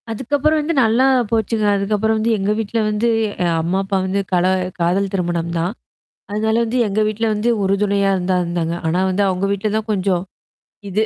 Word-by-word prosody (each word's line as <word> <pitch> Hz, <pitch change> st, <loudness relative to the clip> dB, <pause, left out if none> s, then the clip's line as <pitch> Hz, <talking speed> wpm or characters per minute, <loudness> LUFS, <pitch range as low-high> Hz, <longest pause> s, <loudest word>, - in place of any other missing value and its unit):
அதுக்கப்புறம் 290 Hz, +7 st, 0 dB
வந்து 315 Hz, +3 st, -1 dB
நல்லா 230 Hz, +4 st, +3 dB, 0.3 s
போச்சுங்க. 220 Hz, -1 st, 0 dB
அதுக்கப்புறம் 210 Hz, +2 st, 0 dB
வந்து 220 Hz, +2 st, 0 dB
எங்க 200 Hz, +1 st, 0 dB
வீட்ல 225 Hz, +1 st, -2 dB
வந்து 215 Hz, +3 st, 0 dB, 0.3 s
அ -, -, +1 dB, 0.2 s
அம்மா 175 Hz, +4 st, 0 dB
அப்பா 195 Hz, 0 st, -1 dB
வந்து 195 Hz, +1 st, 0 dB
கல 180 Hz, 0 st, +3 dB, 0.3 s
காதல் 185 Hz, +3 st, +1 dB
திருமணம் 170 Hz, -2 st, -1 dB
தான். 175 Hz, +4 st, -1 dB, 0.6 s
அதனால 220 Hz, +2 st, 0 dB
வந்து 235 Hz, +3 st, -1 dB
எங்க 205 Hz, +1 st, -1 dB
வீட்ல 215 Hz, +2 st, -1 dB
வந்து 210 Hz, +3 st, -1 dB
உறுதுணையா 200 Hz, 0 st, +1 dB
இருந்தா 185 Hz, 0 st, 0 dB
இருந்தாங்க. 170 Hz, -1 st, -2 dB
ஆனா 170 Hz, +3 st, 0 dB
வந்து 190 Hz, +2 st, +1 dB
அவவுங்க 190 Hz, 0 st, 0 dB
வீட்ல 200 Hz, +2 st, -1 dB
தான் 220 Hz, 0 st, -3 dB
கொஞ்சம், 185 Hz, -3 st, 0 dB, 0.7 s
இது 200 Hz, +3 st, 0 dB
200 Hz, 175 wpm, -19 LUFS, 185-220 Hz, 0.7 s, நல்லா